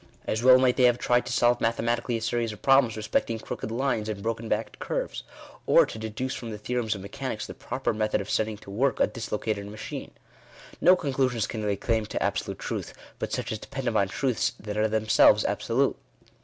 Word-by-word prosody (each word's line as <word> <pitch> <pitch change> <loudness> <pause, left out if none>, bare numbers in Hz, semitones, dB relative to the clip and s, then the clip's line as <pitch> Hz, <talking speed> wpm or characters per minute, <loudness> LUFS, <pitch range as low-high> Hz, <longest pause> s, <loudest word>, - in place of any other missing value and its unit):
As 110 - -1
well 130 +1 +8
might 130 -1 +3
they 130 - +5
have 120 -1 +4
tried 120 0 +1
to - - -3
solve 120 0 +3
mathematically 115 +1 0
a 110 - -6
series 115 0 0
of 105 - -12
problems 135 -5 +4
respecting 110 +1 -1
crooked 110 - -6
lines 115 -2 -1
and 100 -2 -4
broken 115 0 -3
backed 110 +2 -2
curves, - - -3 0.5
or - - +6
to 110 - -8
deduce 110 +4 -3
from 115 - -6
the 105 - -5
theorems 110 0 -1
of 100 - -7
mechanics 100 +1 -5
the - - -8
proper - - -3
method 110 0 0
of 100 - -5
setting 110 0 0
to 100 - -12
work 130 +6 +1
a - - +5
dislocated 105 -3 -3
machine. 105 +1 -7 0.7
No 180 +2 +7
conclusions 130 - 0
can 110 - -5
lay 105 -1 0
claim 110 0 -1
to - - -2
absolute - - -2
truth, - - -5 0.2
but - - -3
such - - -2
as 110 - -3
depend 135 +3 -6
upon 110 -4 +2
truths 125 +4 0
that 105 0 -6
are 105 +1 +2
themselves 110 0 +4
absolute. - - +1
115 Hz, 205 wpm, -27 LUFS, 105-125 Hz, 0.7 s, well